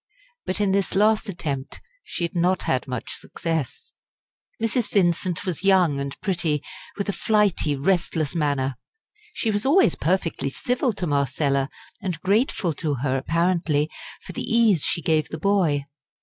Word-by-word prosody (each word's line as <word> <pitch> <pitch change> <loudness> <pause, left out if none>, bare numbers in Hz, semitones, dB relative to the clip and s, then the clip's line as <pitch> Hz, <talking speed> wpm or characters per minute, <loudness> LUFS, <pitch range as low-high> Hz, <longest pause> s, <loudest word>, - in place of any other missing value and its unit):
But 185 - 0
in 205 -2 +2
this 195 0 0
last 210 +1 +3
attempt 145 -7 -4 0.2
she - - -4
had 170 - -2
not 175 +1 +2
had 130 +1 0
much 125 -3 -4
success. 160 -6 -4 0.7
Mrs. 225 +1 0
Vincent 175 -2 +1
was 180 -1 -3
young 180 -7 +4
and 140 0 -5
pretty, 165 -6 0 0.3
with 200 - -2
a 200 - 0
flighty, 205 -10 +2
restless 160 -1 0
manner. 140 -5 0 0.5
She 225 - -1
was 205 0 0
always 325 +9 +4
perfectly 165 -5 0
civil 250 - 0
to 190 -2 -3
Marcella, 140 -1 +1 0.3
and 180 -5 -3
grateful 200 - +1
to 150 -3 0
her 130 +1 -1
apparently 165 0 +1 0.3
for - - -8
the - - -4
ease 225 -8 +3
she 170 - 0
gave 155 -2 +1
the 155 - -5
boy. 160 -6 +2
170 Hz, 150 wpm, -24 LUFS, 145-200 Hz, 0.7 s, young